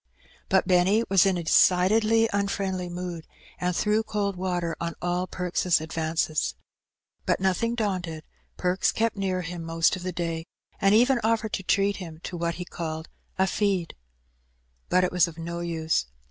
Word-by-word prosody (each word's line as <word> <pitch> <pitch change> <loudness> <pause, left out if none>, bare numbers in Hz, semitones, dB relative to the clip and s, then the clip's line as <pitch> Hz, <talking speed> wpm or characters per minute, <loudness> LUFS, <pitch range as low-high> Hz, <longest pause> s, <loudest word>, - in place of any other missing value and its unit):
But - - +3
Benny 190 +4 +4
was 195 0 +5
in 190 -2 +2
a 170 - -3
decidedly 215 +7 +4
unfriendly 195 -2 -1
mood, 175 -2 -6 0.3
and 180 0 0
threw 210 +3 +2
cold 205 -3 -2
water 180 -2 -2
on 170 -1 -3
all 180 +1 -1
Perks' 180 -1 +1
advances. 160 0 -1 0.7
But, - - +2
nothing 190 +5 +1
daunted. 180 -8 -2 0.3
Perks 180 +1 +1
kept 225 0 0
nearUiim 185 -3 -2
most 165 0 +2
of 185 - -8
the 185 +1 -3
day, 165 -1 -3 0.3
and 195 +1 +4
even 245 +3 +4
offered 220 -1 +1
to - - -1
treat 200 +2 +1
him 165 -4 -8
to 180 - -5
what 170 0 -1
he 180 - -6
called 160 -3 -5 0.3
''a 190 0 +3
feed." 190 -5 0 0.9
But 185 - +4
it 180 - +1
was 180 -1 +4
of 165 -1 -10
no 170 +1 -5
use. 160 - -1
180 Hz, 160 wpm, -26 LUFS, 170-200 Hz, 0.9 s, was